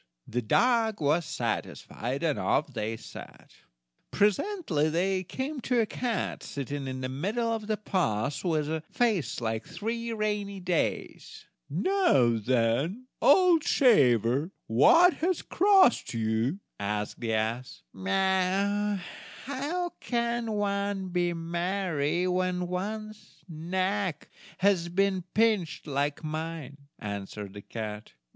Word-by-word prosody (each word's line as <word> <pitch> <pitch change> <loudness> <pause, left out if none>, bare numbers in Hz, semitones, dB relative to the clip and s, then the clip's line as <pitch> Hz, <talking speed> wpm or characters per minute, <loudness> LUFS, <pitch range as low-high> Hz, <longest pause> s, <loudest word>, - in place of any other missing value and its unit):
The 125 - -1
dog 225 - +2
was 155 +3 +2
satisfied, 130 +6 -3
and 155 -4 +1
off 140 -1 0
they 110 -1 -3
set. - - -12 0.6
Presently 205 - +1
they 185 +3 0
came 265 - -4
to 245 0 +1
a 225 - +3
cat, 235 +2 -2
sitting 140 0 -5
in 130 0 -4
the 130 - -2
middle 205 - -1
of 220 -2 -4
the 215 -1 0
path, 140 - -1
with 155 -5 0
a 160 +1 -2
face 200 - 0
like 110 -1 -2
three 230 +2 -4
rainy 210 -2 -2
days! 180 -2 -2 0.2
"Now, 165 - +3
then, 130 - 0
old 340 +1 +5
shaver, 135 - +4 0.2
what 330 - +6
has 355 +1 0
crossed 380 - +4
you?" 115 - 0 0.2
asked 105 +1 -3
the 115 -2 -1
ass. 115 +4 -3 1.6
"How 295 +7 -2
can 235 -2 -1
one 200 -2 -1
be 175 -1 +1
merry 170 -1 -1
when 180 0 0
one's 215 +4 -6
neck 185 +1 -2 0.3
has 185 -3 +2
been 190 0 +1
pinched 210 -8 +1
like 145 +1 -1
mine?" 155 -2 -5 0.2
answered 100 -1 -6
the 100 - -8
cat. 105 0 -7
180 Hz, 115 wpm, -28 LUFS, 135-215 Hz, 1.6 s, what